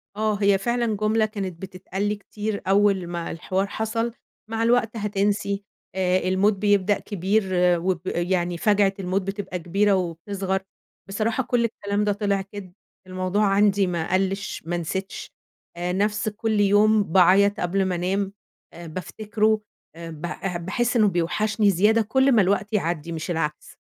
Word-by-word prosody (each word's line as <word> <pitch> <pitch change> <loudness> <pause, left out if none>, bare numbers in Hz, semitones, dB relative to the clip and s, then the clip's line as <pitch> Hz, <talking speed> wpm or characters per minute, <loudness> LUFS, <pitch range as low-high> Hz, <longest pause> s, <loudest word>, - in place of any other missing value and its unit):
آه، 215 0 0
هي 200 -1 +4
فعلًا 235 +2 0
جملة 215 +1 +2
كانت 195 -5 -5
بتتقال 190 0 -6
لي 210 - 0
كتير 210 +1 -5
أول 195 -2 +3
ما 170 -1 -4
الحوار 185 +4 -2
حصل: 225 +3 -2 0.4
"مع 225 0 -1
الوقت 235 -1 +2
هتنسي، 200 -1 -1 0.3
آآ، 185 -1 +2
الموت 190 +3 +3
بيبدأ 205 0 +2
كبير 205 +2 0 0.4
وب 180 -1 -1
يعني 175 0 -1
فاجعة 205 +1 +3
الموت 190 +1 -1
بتبقى 195 -1 -5
كبيرة 195 +5 +2
وبتصغر."، 190 +2 -2 0.5
بصراحة 220 +5 -1
كُلّ 240 -1 +1
الكلام 205 -2 -2
ده 210 - +1
طلع 200 -1 0
كدب، 195 -2 -10 0.3
الموضوع 185 +3 0
عندي 200 0 +3
ما 170 -1 -2
قَلّش، 195 +1 -1
ما 175 +1 -2
نسيتش، 190 +3 -5 0.5
آآ، 175 +1 -2
نفس 210 +3 0
كُلّ 215 0 -1
يوم 205 +1 +4
باعيط 195 +2 +4
قبل 190 +2 0
ما 185 -1 -1
أنام 190 +3 -1 0.4
آآ، 170 0 -9
بافتكره، 215 +6 -1 0.3
آآ، 165 0 -8
ب 155 -2 -11 0.4
باحس 240 +6 0
إنه 215 -3 +5
بيوحشني 200 +4 +1
زيادة 210 +5 +3
كُلّ 265 +5 +2
ما 230 -4 +5
الوقت 200 +3 0
يعدي 170 -4 -1
مش 165 +2 -4
العكس. 150 -2 -3
200 Hz, 150 wpm, -24 LUFS, 185-210 Hz, 0.5 s, إنه